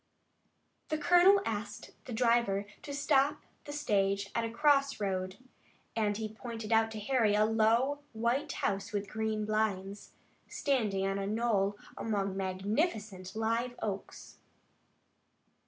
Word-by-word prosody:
The 310 - 0
colonel 355 +6 +6
asked 210 -2 -4
the 255 - -8
driver 230 -4 +2 0.2
to 290 - -8
stop 285 0 +2 0.2
the 290 - -6
stage 200 -8 0
at 230 - 0
a 230 - -2
cross 275 +2 +3
road, 185 -2 -2 0.6
and 210 -2 +1
he 220 -1 -3
pointed 225 0 -5
out 225 0 +4
to 220 -1 -6
Harry 215 -2 +2
a 210 +1 +4
low, 225 +6 +2
white 235 +4 0
house 195 0 -2
with 205 -1 -2
green 215 +1 -2
blinds, 205 -2 -2 0.3
standing 215 -9 0
on 195 0 -1
a 195 - -2
knoll 205 -2 +1 0.2
among 200 -3 -1
magnificent 195 - -2
live 230 +2 -1
oaks. 200 -2 -6
220 Hz, 130 wpm, -32 LUFS, 200-245 Hz, 0.6 s, colonel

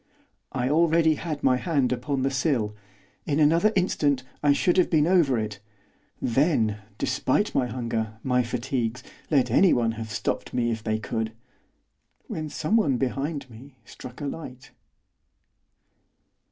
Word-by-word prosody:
I 125 -1 -1
already 160 +2 +4
had 155 -1 -5
my 130 -1 +4
hand 140 -5 0
upon 130 +2 -1
the 135 - +1
sill, 130 -6 0 0.5
in 150 0 +1
another 165 +8 +4
instant 145 -8 +1 0.2
I 145 - +4
should 175 +5 +2
have 185 - +4
been 155 -3 +3
over 165 -8 +3
it, 105 -2 -3 0.6
then, 115 -5 +1 0.2
despite - - 0
my 125 - +1
hunger, 115 -2 -3
my 125 -1 +2
fatigues, 125 0 -2 0.3
let 140 -5 +2
anyone 120 -12 +4
have 110 0 -6
stopped 105 - -3
me 120 -1 +1
if 110 -1 -4
they 110 -1 0
could! 110 0 -3 0.9
when 155 -1 -5
someone 155 - +1
behind 140 +3 -2
me 125 +3 -14
struck 125 +4 -11
a - - -3
light. 135 -4 -7
130 Hz, 140 wpm, -25 LUFS, 120-155 Hz, 0.9 s, already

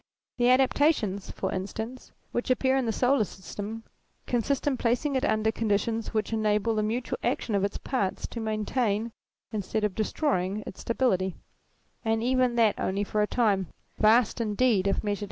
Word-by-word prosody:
The 245 0 +3
adaptations, 255 -6 +2
for - - -3
instance, 220 +6 -5 0.2
which 240 - -2
appear 260 +1 +3
in 265 -3 +1
the - - +2
solar 250 +1 +3
system 205 +4 -7 0.4
consist 250 +3 0
in 285 -2 +2
placing 250 +4 0
it 260 - +1
under 220 0 +2
conditions 225 +1 -1
which 215 0 -1
enable 215 0 +1
the 215 - +1
mutual 230 +4 -2
action 240 -2 -1
of 200 -1 +2
its 200 - -1
parts 205 -8 -2
to 235 - -6
maintain 220 0 -1 0.4
instead 215 0 -2
of 210 -2 +1
destroying 210 - -1
its - - -8
stability, 190 -7 0 0.7
and 225 0 +1
even 255 -1 +2
that 225 -3 +3
only 195 +2 0
for 210 +1 -1
a 210 - +2
time, 205 -7 +1 0.3
vast 225 +2 +4
indeed 210 -2 +2
if 195 - 0
measured. 205 -1 -1
220 Hz, 165 wpm, -27 LUFS, 205-245 Hz, 0.7 s, vast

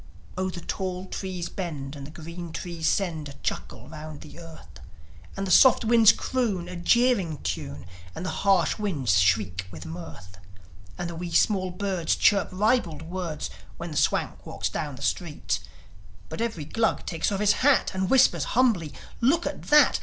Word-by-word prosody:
Oh, 185 0 -1
the 180 -1 -7
tall 185 +1 -3
trees 185 -2 -4
bend, 150 -7 -5
and 140 +1 -8
green 170 +2 -8
trees 170 -3 -3
send 160 -7 -1
A - - -9
chuckle - - -4
round 155 -1 -9
the 155 +2 -12
earth, 165 - -13 0.6
And 195 - -2
the 185 - -2
soft 255 +5 +7
winds 225 -1 +7
croon 215 -9 -1
a 180 - -7
jeering 195 -3 +2
tune, 75 +2 -4 0.3
And 170 - -5
the - - -2
harsh 195 -2 +3
winds 140 - +1
shriek 95 0 +1
with 85 -2 -9
mirth, 90 +3 -9 0.6
And 175 - -3
the 170 - -6
wee 175 +1 -5
small 185 +1 +2
birds 180 -2 -1
chirp 200 -2 +3
ribald 185 - +1
words 170 -2 -4 0.3
When 170 0 -6
the - - -6
Swank 150 - 0
walks - - -3
down 145 -3 -4
the 135 - -9
street; 160 +1 -1 0.7
But - - -5
every 220 -10 -2
Glug 225 +9 0
takes 165 +4 -1
off 195 - -1
his 210 0 +4
hat, 275 0 +4
And 190 0 -1
whispers 265 -1 +4
humbly, 210 - +2 0.3
"Look 300 +8 +3
at 290 - -4
that! 295 -2 +6
175 Hz, 170 wpm, -26 LUFS, 155-200 Hz, 0.7 s, soft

